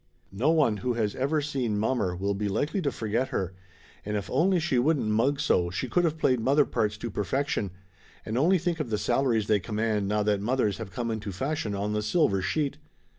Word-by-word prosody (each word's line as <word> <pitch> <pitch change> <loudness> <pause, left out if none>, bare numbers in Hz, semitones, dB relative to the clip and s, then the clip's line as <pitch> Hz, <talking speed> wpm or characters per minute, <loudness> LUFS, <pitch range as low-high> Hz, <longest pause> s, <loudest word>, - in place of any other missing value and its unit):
No 120 +10 +1
one 150 -10 +3
who 120 +5 -1
has 110 -3 -1
ever 145 +4 0
seen 130 -7 -1
mommer 105 -4 0
will 100 +3 -1
be 105 +1 -2
likely 150 - -1
to 140 - 0
forget 115 +3 -1
her, 95 -9 -2 0.5
and 105 +1 -2
if 100 - -5
only 175 +7 +3
she 160 -6 +1
wouldn't 145 +1 +2
mug 130 +6 +2
so 85 -1 +2
she 95 +8 -3
could 175 +9 +2
of 160 0 -2
played 130 -5 +2
mother 140 +5 +3
parts 105 -1 -1
to 120 +1 -5
perfection, 105 +2 -1 0.6
and 110 - -3
only 170 +9 +4
think 170 -1 -2
of 150 - -2
the 105 - 0
salaries 115 0 +1
they 105 -1 +3
command 105 0 -1
now 105 +1 +1
that 105 -1 +1
mothers 110 -3 0
have - - -6
come 115 +5 -3
into 110 -2 -4
fashion 115 0 -2
on 105 +2 -2
the 105 - 0
silversheet 140 - +1
115 Hz, 210 wpm, -27 LUFS, 105-140 Hz, 0.6 s, only